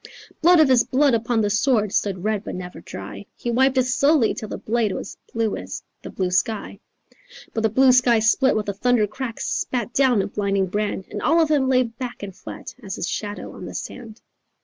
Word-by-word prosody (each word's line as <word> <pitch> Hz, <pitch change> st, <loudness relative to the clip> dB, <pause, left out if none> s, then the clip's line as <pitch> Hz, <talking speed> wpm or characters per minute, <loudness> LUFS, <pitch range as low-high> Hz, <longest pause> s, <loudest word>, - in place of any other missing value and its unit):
Blood 345 Hz, +1 st, +6 dB
of 310 Hz, -, +6 dB
his 255 Hz, -2 st, +5 dB
blood 275 Hz, 0 st, +2 dB
upon 230 Hz, 0 st, +1 dB
the 205 Hz, -1 st, 0 dB
sword 215 Hz, -1 st, +2 dB
Stood 190 Hz, -3 st, -1 dB
red 215 Hz, -1 st, -1 dB
but -, -, -6 dB
never 180 Hz, -1 st, -8 dB
dry. -, -, -9 dB
He 240 Hz, -, -3 dB
wiped 265 Hz, +2 st, +3 dB
it 255 Hz, -, +5 dB
slowly, 265 Hz, 0 st, +3 dB
till 215 Hz, -, -7 dB
the -, -, -4 dB
blade 225 Hz, -2 st, 0 dB
Was -, -, -6 dB, 0.2 s
blue 225 Hz, -2 st, 0 dB
as -, -, -7 dB, 0.2 s
the -, -, -8 dB
blue 185 Hz, -2 st, -2 dB
sky. 215 Hz, +4 st, -1 dB, 0.7 s
But 225 Hz, -, -1 dB
the 220 Hz, -, +2 dB
blue 260 Hz, +4 st, +5 dB
sky 245 Hz, -2 st, +5 dB
split 220 Hz, +4 st, +3 dB
with 215 Hz, -1 st, -1 dB
a 200 Hz, -, -1 dB
thunder 235 Hz, +2 st, +2 dB
crack, 230 Hz, +2 st, -6 dB
Spat 240 Hz, -1 st, -2 dB
down 255 Hz, -7 st, +3 dB
a -, -, -3 dB
blinding 200 Hz, -1 st, 0 dB
brand, 205 Hz, 0 st, -2 dB
And 205 Hz, -, -5 dB
all 330 Hz, +2 st, +3 dB
of 320 Hz, -2 st, +2 dB
him 270 Hz, -3 st, +2 dB
lay 255 Hz, -1 st, +4 dB
back 240 Hz, 0 st, -7 dB
and 195 Hz, -2 st, -7 dB
flat -, -, -9 dB
As 195 Hz, -2 st, -6 dB
his -, -, -3 dB
shadow 205 Hz, -1 st, -5 dB
on -, -, -9 dB
the -, -, -8 dB
sand." 230 Hz, -3 st, -8 dB
230 Hz, 215 wpm, -22 LUFS, 205-255 Hz, 0.7 s, Blood